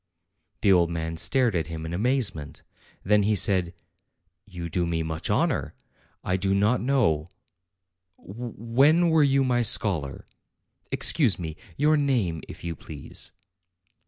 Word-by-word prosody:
The 100 -3 +5
old 85 -2 +3
man 80 -1 -4
stared 110 +9 +2
at 85 -1 -1
him 80 -1 -6
in 80 - -5
amazement. 105 - -1 0.4
Then 105 +2 +3
he 105 +1 +1
said: 95 -4 +2 0.8
"You 90 -4 -7
do 85 +1 -1
me 80 -1 -1
much 80 0 -4
honor. - - 0 0.5
I 90 - 0
do 95 +1 0
not 105 +5 +2
know 105 - +1 0.9
when 125 - +1
were 160 -1 +4
you 135 -1 +3
my 125 -2 +1
scholar? 90 - 0 0.6
Excuse 120 - +3
me; 80 -3 -6 0.2
your 150 +2 +3
name, 120 - 0
if - - -11
you 85 -1 -4
please." 75 -3 -5
100 Hz, 135 wpm, -25 LUFS, 85-125 Hz, 0.9 s, The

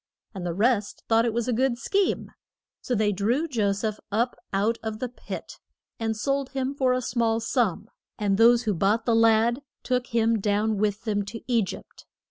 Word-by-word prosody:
And 190 -3 -6
the 170 - -3
rest 215 0 +1
thought 225 0 +4
it 230 - 0
was 235 +1 -1
a 250 - +1
good 250 +1 +1
scheme. 390 +10 0 0.5
So 250 - -1
they 210 -1 +2
drew 230 - 0
Jo 220 -9 +1
seph 210 +1 -2
up 235 +4 0 0.2
out 210 +4 +1
of 220 -1 -4
the 255 - -3
pit 245 - -8 0.4
and 225 -1 -1
sold 275 +3 -1
him 265 0 -1
for 265 -2 +1
a 255 0 0
small 230 -2 +1
sum, 225 -4 0 0.3
and 205 -2 +1
those 235 +1 +6
who 215 -3 0
bought 205 +5 +1
the 235 - +2
lad 225 +2 +4 0.2
took 250 -1 0
him 230 -2 +2
down 210 +1 +1
with 210 +1 0
them 205 -3 0
to 220 +3 -7
E 240 -3 +2
gypt. 190 - -8
225 Hz, 195 wpm, -26 LUFS, 210-245 Hz, 0.5 s, those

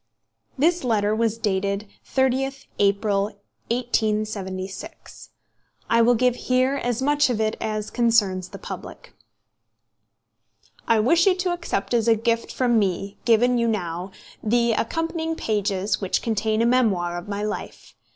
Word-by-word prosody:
This 335 +4 +2
letter 215 -3 +1
was 225 0 0
dated 200 -1 -1 0.2
30th 265 +1 0
April, 200 0 +2 0.4
1876. 215 -5 -3 0.6
I 230 0 +5
will 240 +1 +5
give 250 +1 +3
here 255 +2 +1
as 245 -1 -2
much 290 0 +3
of 235 -3 -1
it 220 0 0
as 215 -1 -3
concerns 210 -6 +2
the - - -9
public: - - -9 1.7
"I 230 -1 +4
wish 335 - +4
you 375 - +5
to 365 -1 -1
accept 340 - -3
as 235 -1 +2
a 230 - +6
gift 230 +1 -1
from 240 -3 +2
me, 195 0 -2
given 240 +1 +4
you 235 - +1
now, 180 -4 -2 0.3
the 235 +2 +2
accompanying 325 +7 -1
pages 200 -5 -1
which 190 - -1
contain 220 0 0
a - - +3
memoir 210 -9 +2
of 175 +2 -6
my 205 0 -3
life. 215 0 -6
225 Hz, 140 wpm, -23 LUFS, 205-250 Hz, 1.7 s, a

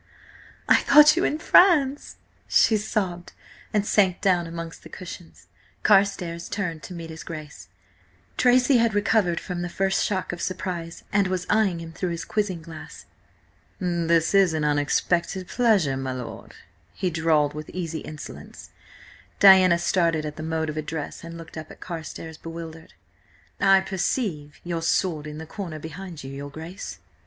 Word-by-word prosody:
"I - - +6
thought 300 +2 +7
you 350 - +1
in 300 - +1
France!" 310 -5 +4 0.3
she 220 - +4
sobbed, 195 -4 -2 0.4
and 210 -1 +1
sank 190 -4 +2
down 180 -4 +2
amongst 165 0 -7
the - - -13
cushions. 180 -2 -10 0.4
Carstares 185 -4 +2
turned 175 -6 -3
to 180 - -9
meet 165 -1 -7
his 160 - -8
Grace 155 -2 -9 0.7
Tracy 250 +1 +4
had 230 -2 +2
recovered 205 -4 +2
from 180 -2 -5
the 175 - -3
first 195 +2 0
shock 190 -3 -2
of 175 - -6
surprise 175 -3 -4
and 200 -1 +3
was 185 -1 -2
eyeing 210 -5 +2
him 165 -1 -8
though 180 - 0
his 170 -1 -4
quizzing 190 -6 -2
glass. 165 -1 -10 0.7
"This 170 -2 +1
is 190 -4 +4
an 155 - -1
unexpected 170 +5 0
pleasure, 200 - +2
my 130 -1 -3
lord," 125 -2 -8 0.4
he 185 - -1
drawled 155 -3 +2
with 150 0 -7
easy 165 -3 -4
insolence. 155 -1 -10 0.7
Diana 190 -3 +8
started 170 -3 +1
at 150 -1 -5
the - - -7
mode 160 0 -2
of 155 - -9
address 155 +1 -5
and 170 0 -8
looked 165 -1 -9
up 155 - -10
at - - -13
Carstares, 160 -2 -7
bewildered. 165 -1 -9 0.6
"I 195 0 +5
perceive 190 - -2
your 170 -1 -3
sword 165 -2 0
in 150 0 -7
the 160 - -7
corner 170 -2 -6
behind 160 +1 -8
you, 135 - -7
your 140 +1 -7
Grace!" 160 +6 -8
170 Hz, 160 wpm, -25 LUFS, 160-195 Hz, 0.7 s, Diana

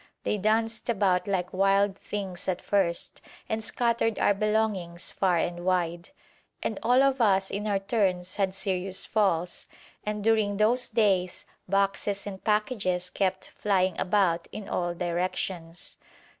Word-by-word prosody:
They 210 - 0
danced 225 +3 0
about 195 -4 +2
like 185 -2 -1
wild 195 +1 +3
things 190 -3 -5
at 185 -1 0
first, 185 -4 0 0.3
and 220 0 -2
scattered 235 -1 0
our - - +3
belongings 200 -4 -1
far 185 -3 +2
and 175 +1 -2
wide, 175 -1 0 0.5
and 220 - -2
all 250 +4 +4
of 270 -2 +2
us 195 -3 +3
in 205 +2 -3
our 200 -1 +2
turns 195 -3 -1
had 195 -2 0
serious 190 -1 -1
falls, 180 -5 0 0.4
and 210 -1 -3
during 215 -2 +2
those 235 +4 +2
days, 195 -5 +1 0.2
boxes 200 +1 0
and 195 -2 -7
packages 210 -5 0
kept 190 -1 -1
flying 190 -3 +1
about 180 -4 +2
in 210 - -7
all 175 -1 -1
directions. 175 -1 -3
195 Hz, 140 wpm, -27 LUFS, 180-210 Hz, 0.5 s, all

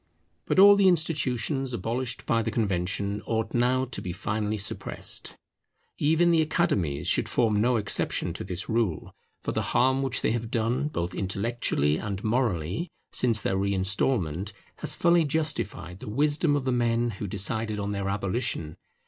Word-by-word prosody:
But - - 0
all 200 +1 +9
the 200 -1 +4
institutions 140 -6 0
abolished 120 +3 -3
by 115 0 +2
the - - -2
Convention 100 -1 -1
ought 110 -1 -1
now 125 +2 +2
to 125 -2 -5
be 90 - -4
finally 105 +4 -2
suppressed. 105 - -4 0.6
Even 160 +3 +3
the 165 -1 +4
Academies 85 - 0
should - - +2
form 110 -3 +2
no 125 +2 +3
exception 105 -3 +1
to - - -6
this 90 0 -3
rule, 110 -8 -1 0.3
for - - -2
the - - -1 0.2
harm 130 +2 +3
which 135 -2 0
they - - +2
have 115 -1 -2
done, 120 +5 0
both 85 - -3
intellectually 95 -7 0
and 100 +1 -5
morally, 110 - -1 0.2
since 115 -4 +2
their 95 - 0
reinstalment, 95 - 0 0.2
has - - +1
fully 170 -1 +4
justified 140 - -2
the - - -8
wisdom 145 +5 +2
of 140 -2 -2
the 130 - +1
men 120 -1 +1
who 105 - -2
decided 105 +3 -1
on 100 0 -3
their 100 -1 -2
abolition. 100 -5 -2
115 Hz, 160 wpm, -27 LUFS, 100-130 Hz, 0.6 s, all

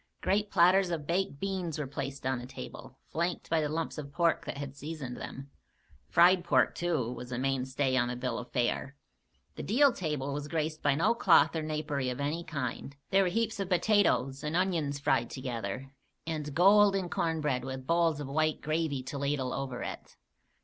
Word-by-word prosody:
Great 205 +1 +1
platters 185 +2 +5
of 165 -4 -3
baked 170 -3 -1
beans 185 -4 -2
were 150 - -2
placed 135 0 -5
on 130 -1 0
the 125 - -8
table, 135 - -9
flanked 170 +1 -2
by 165 -1 +3
the 150 - -1
lumps 160 0 -3
of 140 -2 -7
pork 170 +1 +1
that - - -5
had 140 -1 -6
seasoned 145 -3 -6
them. 135 +1 -8 0.6
Fried 175 +1 +5
pork, 175 - +3
too, 160 -9 -1
was 125 0 -8
a 120 - -2
"main 135 0 0
stay" 130 0 0
on 120 -1 +2
the 125 - -3
bill 125 +1 -2
of 125 - -9
fare. 125 +2 -1 0.6
The - - -4
deal 270 +5 +4
table 150 -5 -2
was 145 0 -4
graced 155 0 -2
by 145 -1 +3
no 165 +9 +3
cloth 185 -7 +5
or 160 - 0
napery 150 -4 -2
of 125 - -4
any 150 +4 -1
kind. 140 -2 -4 0.2
There 195 - +5
were 185 - +2
heaps 220 +3 -1
of 195 -2 -2
potatoes 180 -8 +2
and 150 +2 -2
onions 170 -6 0
fried 140 - +1
together, 130 0 -5 0.3
and 150 -3 -4
golden 195 +1 +5
cornbread 150 -7 -1
with 130 0 -6
bowls 165 -1 +2
of 145 - -5
white 155 +3 +1
gravy 155 -4 -1
to 140 +2 -5
ladle 140 -2 -1
over 130 -3 -4
it. - - -7
150 Hz, 190 wpm, -30 LUFS, 135-170 Hz, 0.6 s, platters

